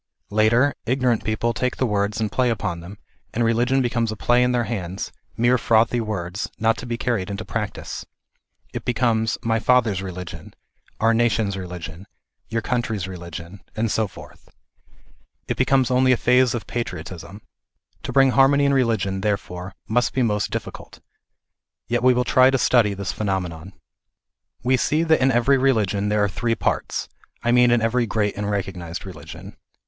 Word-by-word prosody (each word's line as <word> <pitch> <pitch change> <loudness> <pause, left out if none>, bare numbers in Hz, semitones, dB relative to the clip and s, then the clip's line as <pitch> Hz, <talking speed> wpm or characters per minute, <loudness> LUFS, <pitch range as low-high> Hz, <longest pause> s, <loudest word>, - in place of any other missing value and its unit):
Later, 115 +6 +3
ignorant 125 -2 +1
people 110 +2 0
take 125 +3 -2
the 130 - +1
words 105 -1 0
and 110 -2 -1
play 125 -1 +1
upon 90 -6 -2
them, 90 +5 -10 0.4
and 120 - +1
religion 120 +4 +2
becomes 120 -2 0
a - - -4
play 120 +3 +2
in 125 0 +3
their 120 -1 +1
hands, 95 -5 -4 0.3
mere 120 +2 +3
frothy 115 +1 +3
words, 95 -3 -4
not 115 +1 +2
to 125 - -7
be 120 -1 -2
carried 115 -7 -1
into 100 +2 -5
practice. 105 -3 -4 0.7
It - - -5
becomes 115 -2 +1
" - - -31
my 115 0 +1
father's 115 -6 +2
religion," 90 -4 -8 0.2
" - - -36
our 115 +1 +3
nation's 115 -3 +1
religion," 90 -1 -7 0.2
" - - -48
your 115 0 -2
country's 120 -7 -2
religion,^ 85 0 -8 0.2
and 110 0 0
so 110 -1 +1
forth. - - -14 1.0
It - - -1
becomes 130 -2 +2
only 130 +1 +4
a 125 - +4
phase 125 +1 +3
of 115 - -4
patriot 95 -9 -4
ism. 95 +3 -10 0.6
To - - -5
bring 135 -1 +5
harmony 140 +2 +4
in 140 - +3
religion, 110 -7 +1
therefore, 95 -3 -3
must 120 +3 +1
be 130 - +2
most 105 -3 0
difficult. - - -7 0.9
Yet 120 +1 0
we 125 0 +5
will 125 - +2
try 130 +1 +5
to 135 - +2
study 115 -5 +3
this 100 -2 -3
phenomenon. 95 -3 -3 0.9
We 130 +2 +3
see 155 +6 +1
that 160 -3 +3
in 130 +1 +4
every 130 +3 +3
religion 105 -6 +1
there 105 0 +2
are - - +3
three 115 +3 -1
parts - - -2
ŌĆö - - -34
I 120 - +2
mean 125 0 +5
in 120 -1 +3
every 120 +1 +1
great 105 -1 0
and 105 0 -3
recognized 95 -4 -4
religion. 95 - -10
115 Hz, 180 wpm, -22 LUFS, 100-125 Hz, 1.0 s, bring